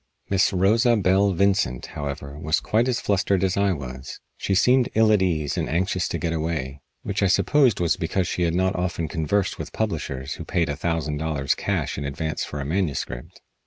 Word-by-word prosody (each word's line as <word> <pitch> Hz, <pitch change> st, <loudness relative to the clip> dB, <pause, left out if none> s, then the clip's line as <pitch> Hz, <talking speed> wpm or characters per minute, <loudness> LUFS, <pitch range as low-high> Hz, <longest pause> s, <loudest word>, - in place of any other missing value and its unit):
Miss 95 Hz, -1 st, +3 dB
Rosa 110 Hz, +6 st, +3 dB
Belle 100 Hz, 0 st, +3 dB
Vincent, 90 Hz, -10 st, +1 dB
however, 70 Hz, -1 st, -5 dB
was 80 Hz, +1 st, +1 dB
quite 115 Hz, +3 st, +1 dB
as 125 Hz, -2 st, 0 dB
flustered 100 Hz, -1 st, +1 dB
as 95 Hz, -1 st, +1 dB
I 100 Hz, 0 st, +2 dB
was. 65 Hz, -5 st, -6 dB, 0.2 s
She 95 Hz, -, -1 dB
seemed 125 Hz, +5 st, +4 dB
ill 110 Hz, 0 st, +5 dB
at 105 Hz, -3 st, +4 dB
ease 80 Hz, -6 st, 0 dB
and -, -, -2 dB
anxious 90 Hz, +2 st, 0 dB
to -, -, -3 dB
get 85 Hz, -2 st, -2 dB
away, 75 Hz, -4 st, -3 dB, 0.2 s
which 100 Hz, 0 st, -2 dB
I 100 Hz, -, +4 dB
supposed 125 Hz, +3 st, +3 dB
was 85 Hz, -2 st, +1 dB
because 85 Hz, +2 st, -1 dB
she 90 Hz, -, -3 dB
had 85 Hz, -1 st, +1 dB
not 95 Hz, +1 st, +1 dB
often 90 Hz, -2 st, -2 dB
conversed 90 Hz, +6 st, -1 dB
with -, -, -6 dB
publishers 65 Hz, +1 st, -3 dB
who -, -, -7 dB
paid 85 Hz, -1 st, 0 dB
a 75 Hz, -, -1 dB
thousand 80 Hz, -1 st, -2 dB
dollars 75 Hz, -3 st, 0 dB
cash -, -, -2 dB
in -, -, -4 dB
advance 80 Hz, +3 st, -3 dB
for 75 Hz, -, -5 dB
a 70 Hz, -, -4 dB
manuscript. 75 Hz, -7 st, -3 dB
85 Hz, 200 wpm, -24 LUFS, 75-100 Hz, 0.2 s, ill